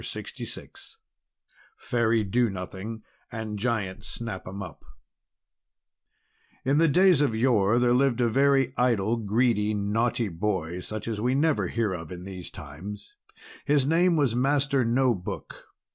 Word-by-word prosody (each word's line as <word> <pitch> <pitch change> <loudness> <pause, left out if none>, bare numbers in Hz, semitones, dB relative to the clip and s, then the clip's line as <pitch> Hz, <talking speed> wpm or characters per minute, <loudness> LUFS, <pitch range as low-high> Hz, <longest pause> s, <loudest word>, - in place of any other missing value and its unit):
_ - - -11
LUCY - - -6
LARCOM - - -8 1.1
FAIRY 115 -3 +1
DO 120 +4 +1
NOTHING 95 +4 -6 0.3
AND 110 -3 -5
GIANT 105 -4 -2
SNAP 110 -6 -6
'EM 100 +2 -6
UP 90 - -11 1.8
In 140 +3 +3
the 165 - +5
days 180 0 +5
of 135 -6 +1
yore 110 -2 +3
there 120 0 +3
lived 130 -1 +2
a 120 - +3
very 135 +1 +3
idle, 115 -2 +2
greedy, 110 -1 +1
naughty 115 +3 0
boy 90 -2 -2
such 110 +4 -6
as 110 -2 -3
we 125 +3 +1
never 140 - +2
hear 110 0 -1
of 80 -2 -7
in 90 0 -7
these 95 -2 -7
times. 90 +8 -9 0.5
His 145 -2 +3
name 170 +4 +3
was 140 -7 +2
Master 140 +1 +2
No 125 +2 +2
Book. 90 -4 -7
115 Hz, 145 wpm, -26 LUFS, 100-130 Hz, 1.8 s, the